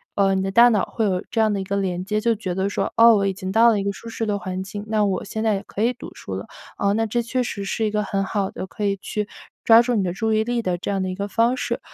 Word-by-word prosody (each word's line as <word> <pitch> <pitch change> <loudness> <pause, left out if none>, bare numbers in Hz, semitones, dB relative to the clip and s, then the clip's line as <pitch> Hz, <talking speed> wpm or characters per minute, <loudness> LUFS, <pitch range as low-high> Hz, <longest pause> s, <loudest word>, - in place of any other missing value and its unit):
呃， 195 -1 +3
你 190 - 0
的 195 - -2
大 235 +4 +7
脑 210 -5 +2
会 225 - -2
有 185 -3 0
这 230 - -1
样 215 -1 +3
的 200 - -1
一 - - -3
个 200 +1 -2
连 180 -2 -2
接， 210 +3 -1
就 230 +1 +1
觉 185 -4 -4
得 190 +2 -1
说 195 -1 -2
哦， 230 0 +8
我 200 -1 +1
已 195 - 0
经 185 0 -6
到 225 +3 +6
了 215 -3 +2
一 - - -2
个 200 0 -1
舒 230 - -10
适 225 0 -3
的 205 -1 0
环 185 -1 -4
境， 195 +2 -6
那 215 -1 +2
我 190 -2 -1
现 220 +2 -5
在 220 -1 +2
也 195 0 -3
可 205 - -6
以 240 +2 +2
读 245 - -10
书 - - -7
了。 - - -6 0.3
呃， 200 0 +1
那 225 +1 +1
这 235 +2 0
确 250 +2 -1
实 205 -4 -4
是 220 +3 -1
一 210 - 0
个 210 0 0
很 195 -1 -1
好 195 -1 -2
的 190 - -6
可 210 - -7
以 200 -1 +1
去 210 +1 -4 0.4
抓 225 0 +7
住 240 0 0
你 205 - +1
的 180 - -1
注 220 +3 -1
意 215 0 +2
力 240 +1 -1
的 180 -5 -1
这 185 - -4
样 195 -1 -1
的 185 - -2
一 185 - -4
个 200 +1 -3
方 230 +4 +2
式。 - - -2
205 Hz, 350 characters per minute, -22 LUFS, 195-225 Hz, 0.4 s, 哦